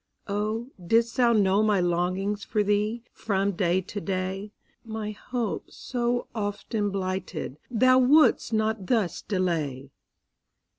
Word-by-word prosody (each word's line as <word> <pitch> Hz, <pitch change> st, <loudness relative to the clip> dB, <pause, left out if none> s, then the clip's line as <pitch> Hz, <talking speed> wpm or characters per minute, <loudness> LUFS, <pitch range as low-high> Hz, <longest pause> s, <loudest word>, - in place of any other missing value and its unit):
Oh, 215 Hz, +5 st, -2 dB
didst 230 Hz, +6 st, +2 dB
thou 240 Hz, -2 st, +5 dB
know 200 Hz, -2 st, +3 dB
my 210 Hz, -2 st, +3 dB
longings 185 Hz, +4 st, 0 dB
For 210 Hz, -2 st, 0 dB
thee, 210 Hz, +3 st, 0 dB
from 200 Hz, -1 st, 0 dB
day 185 Hz, -1 st, +1 dB
to 200 Hz, +2 st, -6 dB
day, 190 Hz, +2 st, -3 dB, 0.3 s
My 220 Hz, -2 st, -4 dB
hopes, 230 Hz, +1 st, -4 dB
so 245 Hz, -1 st, -1 dB
often 205 Hz, 0 st, -2 dB
blighted, 185 Hz, -6 st, -4 dB
Thou 255 Hz, +2 st, +5 dB
wouldst 280 Hz, 0 st, +5 dB
not 220 Hz, -3 st, 0 dB
thus 220 Hz, -8 st, +1 dB
delay! 155 Hz, -9 st, -2 dB
205 Hz, 120 wpm, -26 LUFS, 185-225 Hz, 0.3 s, thou